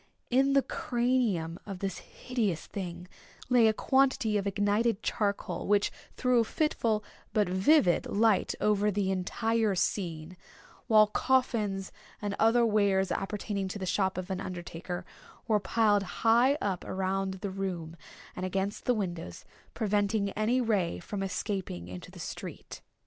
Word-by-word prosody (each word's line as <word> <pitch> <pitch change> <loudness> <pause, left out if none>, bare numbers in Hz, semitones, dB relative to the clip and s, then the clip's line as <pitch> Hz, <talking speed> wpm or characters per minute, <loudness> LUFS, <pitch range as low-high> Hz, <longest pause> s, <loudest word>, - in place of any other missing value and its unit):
In 270 +2 +4
the 275 -1 +4
cranium 240 - 0
of 195 -2 -5
this 195 0 -3
hideous 220 -10 -3
thing 180 -2 -6 0.4
lay 235 -3 +5
quantity 265 -1 +2
of 200 -1 0
ignited 205 +2 +1
charcoal, 200 -4 -1
which 205 0 +3 0.3
threw 250 -1 +3
a - - +4
fitful 225 -5 0 0.3
but 210 -3 +2
vivid 190 - +3
light 215 -1 +2
over 210 0 +2
the 195 -1 0
entire 220 +3 0
scene; 175 -2 -2 0.5
while 215 -2 +7
coffins, 210 -4 0 0.3
and 205 -1 -3
other 230 +2 +4
wares 200 -3 +2
appertaining 200 0 -2
to 190 - -5
the 190 - -4
shop 190 +1 0
of 185 +1 -4
an 190 0 -2
undertaker, 175 0 -6 0.4
were 215 -2 +3
piled 205 +1 +2
high 235 +7 +3
up 195 - -2
around 190 0 -2
the 190 +1 -5
room, 180 -4 -4 0.4
and 185 - -5
against 190 +2 -2
the 250 - +3
windows, 175 - -4 0.3
preventing 205 -1 +1
any 220 +5 +1
ray 205 - +1
from 195 - -5
escaping 185 - -3
into 90 0 -8
the - - -14
street. - - -7
200 Hz, 140 wpm, -30 LUFS, 185-225 Hz, 0.5 s, while